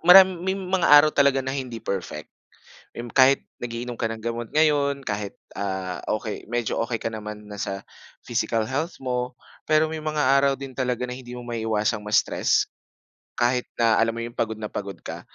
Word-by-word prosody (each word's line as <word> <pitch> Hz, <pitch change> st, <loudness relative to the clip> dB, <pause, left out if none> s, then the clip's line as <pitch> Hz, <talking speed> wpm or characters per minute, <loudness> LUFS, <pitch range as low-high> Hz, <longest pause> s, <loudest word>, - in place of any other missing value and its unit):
marami 190 Hz, +1 st, +10 dB, 0.2 s
may 190 Hz, -, +2 dB
mga 190 Hz, -2 st, 0 dB
araw 145 Hz, +1 st, +8 dB
talaga 140 Hz, -2 st, +3 dB
na 130 Hz, -, -3 dB
hindi 130 Hz, -5 st, -4 dB
perfect. 90 Hz, -7 st, -4 dB, 0.7 s
Yung 120 Hz, 0 st, -6 dB
kahit 135 Hz, +1 st, +5 dB, 0.2 s
nag-iinom 120 Hz, 0 st, -4 dB
ka 115 Hz, -, +1 dB
ng 110 Hz, 0 st, -6 dB
gamot 115 Hz, -1 st, -3 dB
ngayon 145 Hz, -3 st, +2 dB
kahit, 105 Hz, -2 st, -3 dB, 0.2 s
ah, 95 Hz, -2 st, -3 dB, 0.2 s
okey 110 Hz, -1 st, -6 dB
medyo 120 Hz, -1 st, -1 dB
okey 115 Hz, 0 st, -2 dB
ka 115 Hz, -, -3 dB
naman 105 Hz, -1 st, -7 dB
na 105 Hz, -1 st, -8 dB
sa 100 Hz, 0 st, -4 dB, 0.4 s
physical 115 Hz, -1 st, 0 dB
health 145 Hz, +9 st, -2 dB
mo. 125 Hz, 0 st, -2 dB, 0.3 s
Pero 155 Hz, 0 st, +4 dB
may 160 Hz, -, -4 dB
mga 150 Hz, -3 st, +2 dB
araw 140 Hz, -1 st, +2 dB
din 135 Hz, -1 st, -8 dB
talaga 125 Hz, -1 st, -1 dB
na 125 Hz, -, -4 dB
hindi 125 Hz, -1 st, -8 dB
mo 125 Hz, -, -8 dB
maiiwasang 110 Hz, -2 st, -1 dB
ma-stress, 105 Hz, 0 st, +2 dB, 0.7 s
kahit 125 Hz, +1 st, +1 dB
na 115 Hz, -1 st, +4 dB
alam 115 Hz, 0 st, +2 dB
mo -, -, -3 dB
yung 120 Hz, -, -8 dB
pagod 110 Hz, -1 st, -1 dB
na 105 Hz, -1 st, -5 dB
pagod 100 Hz, -1 st, -4 dB
ka. -, -, -6 dB
120 Hz, 185 wpm, -25 LUFS, 110-140 Hz, 0.7 s, marami